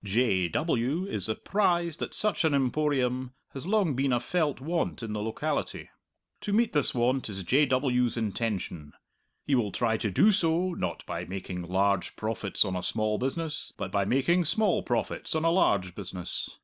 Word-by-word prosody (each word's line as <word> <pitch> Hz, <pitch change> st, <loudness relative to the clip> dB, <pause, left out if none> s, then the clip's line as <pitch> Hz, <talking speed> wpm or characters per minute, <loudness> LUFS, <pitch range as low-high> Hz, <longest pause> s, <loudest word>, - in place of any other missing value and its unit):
J. 100 Hz, -3 st, +2 dB
W. 150 Hz, -, 0 dB
is 105 Hz, -, -4 dB
apprised 170 Hz, -, 0 dB
that -, -, -4 dB
such 210 Hz, -6 st, +3 dB
an 155 Hz, -3 st, +3 dB
Emporium 130 Hz, -2 st, 0 dB, 0.2 s
has 135 Hz, +4 st, -7 dB
long 200 Hz, -7 st, +2 dB
been 135 Hz, +1 st, +1 dB
a 120 Hz, -, +2 dB
felt 150 Hz, +2 st, -1 dB
want 165 Hz, -2 st, -2 dB
in 110 Hz, -2 st, -4 dB
the 105 Hz, -, -3 dB
locality. 110 Hz, +1 st, -3 dB, 0.5 s
To 205 Hz, -, -4 dB
meet 230 Hz, +3 st, +2 dB
this 145 Hz, -4 st, +5 dB
want 125 Hz, +1 st, +1 dB
is 100 Hz, -2 st, -4 dB
J. 140 Hz, -, +3 dB
W.'s 125 Hz, -2 st, +1 dB
intention. 100 Hz, -8 st, -3 dB, 0.5 s
He 145 Hz, -, 0 dB
will 115 Hz, -6 st, +2 dB
try 115 Hz, -2 st, 0 dB
to 110 Hz, -, -2 dB
do 205 Hz, -, +5 dB
so, 180 Hz, -1 st, +1 dB
not 90 Hz, -, -4 dB
by 85 Hz, 0 st, -4 dB
making 90 Hz, -1 st, -5 dB
large 95 Hz, +2 st, 0 dB
profits 110 Hz, -2 st, 0 dB
on 95 Hz, -2 st, -2 dB
a 90 Hz, -, -2 dB
small 110 Hz, +2 st, 0 dB
business, 155 Hz, +4 st, -3 dB
but -, -, -4 dB
by 100 Hz, -1 st, +1 dB
making 165 Hz, -, +2 dB
small 205 Hz, +4 st, +2 dB
profits 120 Hz, +5 st, -2 dB
on 160 Hz, +1 st, 0 dB
a 165 Hz, -, +4 dB
large 100 Hz, -, +2 dB
business. 90 Hz, -2 st, -4 dB
125 Hz, 175 wpm, -28 LUFS, 100-160 Hz, 0.5 s, this